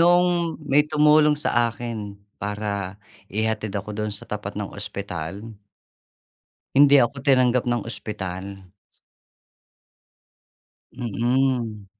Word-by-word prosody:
Noong 175 Hz, -1 st, +3 dB
may 145 Hz, 0 st, +3 dB
tumulong 150 Hz, 0 st, +5 dB
sa 120 Hz, -5 st, +2 dB
akin 110 Hz, -4 st, -6 dB, 0.2 s
para 100 Hz, -1 st, -4 dB, 0.3 s
ihatid 110 Hz, -1 st, -1 dB
ako 100 Hz, +1 st, -4 dB
do'n 105 Hz, 0 st, -2 dB
sa -, -, -10 dB
tapat 105 Hz, -1 st, -5 dB
ng 105 Hz, -1 st, -4 dB
ospital 100 Hz, -2 st, -6 dB, 1.3 s
hindi 140 Hz, +1 st, +7 dB
ako 130 Hz, +1 st, +2 dB
tinanggap 125 Hz, -2 st, +3 dB
ng 120 Hz, -3 st, -1 dB
ospital. 100 Hz, -3 st, -6 dB, 2.3 s
Mm. 120 Hz, -2 st, 0 dB
110 Hz, 95 wpm, -24 LUFS, 100-135 Hz, 2.3 s, hindi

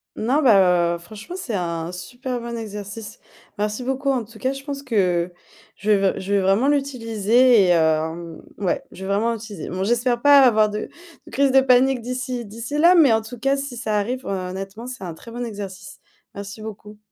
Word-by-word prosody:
Non, 265 Hz, +8 st, +1 dB
bah, 180 Hz, -7 st, +5 dB
heu, -, -, -5 dB
franchement, 215 Hz, -, -10 dB
c'est 275 Hz, -, -4 dB
un 170 Hz, -2 st, -3 dB
super 245 Hz, +8 st, -5 dB
bon 235 Hz, 0 st, -6 dB
exercice. 210 Hz, -1 st, -7 dB, 0.4 s
Merci 210 Hz, +4 st, -2 dB
beaucoup 270 Hz, +2 st, -1 dB
en 255 Hz, -3 st, 0 dB
tout 220 Hz, +1 st, -15 dB
cas, 260 Hz, +5 st, -1 dB
je 275 Hz, 0 st, -9 dB
pense 280 Hz, -1 st, -6 dB
que 180 Hz, -8 st, 0 dB, 0.4 s
je 210 Hz, -, -5 dB
vais 210 Hz, -, +6 dB, 0.2 s
v -, -, -6 dB
je 195 Hz, +2 st, -3 dB
vais 200 Hz, -, +4 dB
vraiment 195 Hz, +7 st, +2 dB
l'utiliser 245 Hz, -4 st, +3 dB
et -, -, +2 dB
hem, 160 Hz, 0 st, +1 dB, 0.2 s
ouais, 190 Hz, -4 st, -1 dB
je 185 Hz, -, -12 dB
vais -, -, -5 dB
vraiment 210 Hz, +4 st, +1 dB
l'utiliser. 215 Hz, -6 st, -7 dB
Bon 185 Hz, +1 st, -3 dB
j'espère 240 Hz, +3 st, +1 dB
pas 285 Hz, 0 st, +7 dB
avoir 215 Hz, -4 st, +4 dB
de 210 Hz, +1 st, -4 dB, 0.4 s
de -, -, -14 dB
crise 270 Hz, +3 st, +2 dB
de 265 Hz, 0 st, +6 dB
panique 260 Hz, 0 st, +4 dB
d'ici 250 Hz, 0 st, -4 dB
d'ici 230 Hz, +7 st, -5 dB
là, 340 Hz, +4 st, +6 dB
mais 320 Hz, -8 st, +6 dB
en 225 Hz, 0 st, +3 dB
tout 225 Hz, +2 st, -9 dB
cas 275 Hz, +3 st, +1 dB
si 275 Hz, -2 st, -5 dB
ça 220 Hz, -3 st, -1 dB
arrive, 245 Hz, +5 st, -2 dB
heu, -, -, -3 dB
honnêtement, 195 Hz, +3 st, -5 dB
c'est 255 Hz, -5 st, -8 dB
un 170 Hz, -3 st, -6 dB
très 230 Hz, -, -13 dB
bon 240 Hz, +1 st, -5 dB
exercice. 200 Hz, -5 st, -8 dB, 0.4 s
Merci 200 Hz, +2 st, -8 dB
beaucoup. 210 Hz, -1 st, -9 dB
225 Hz, 205 wpm, -22 LUFS, 195-255 Hz, 0.4 s, pas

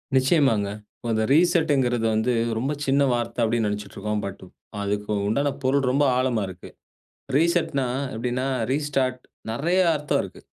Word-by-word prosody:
நிச்சயமாங்க. 130 Hz, -, +3 dB, 0.4 s
அந்த 110 Hz, 0 st, +1 dB
ரீசெட்ங்க்கிறது 145 Hz, -8 st, +3 dB
வந்து 110 Hz, +3 st, +1 dB, 0.2 s
ரொம்ப 135 Hz, +6 st, -1 dB
சின்ன 140 Hz, +1 st, +2 dB
வார்த்தை 120 Hz, 0 st, -3 dB
அப்படின்னு 115 Hz, -1 st, +1 dB
நெனச்சிட்டு 105 Hz, -1 st, -5 dB
இருக்கோம். 105 Hz, +1 st, -2 dB
பட் 100 Hz, -1 st, -7 dB, 0.4 s
அதுக்கு 105 Hz, +1 st, -2 dB, 0.2 s
உண்டான 140 Hz, +7 st, +1 dB
பொருள் 135 Hz, 0 st, +2 dB
ரொம்ப 145 Hz, +2 st, +2 dB
ஆழமா 125 Hz, -4 st, +1 dB
இருக்கு. 90 Hz, -1 st, -10 dB, 0.7 s
ரீசெட்ன்னா, 160 Hz, -4 st, +2 dB, 0.3 s
எப்படின்னா, 125 Hz, +3 st, -2 dB, 0.3 s
ரீஸ்டார்ட், 135 Hz, -3 st, 0 dB, 0.3 s
நெறைய 170 Hz, +10 st, +1 dB, 0.2 s
அர்த்தம் 150 Hz, 0 st, 0 dB
இருக்கு. -, -, -10 dB
130 Hz, 130 wpm, -24 LUFS, 110-140 Hz, 0.7 s, நிச்சயமாங்க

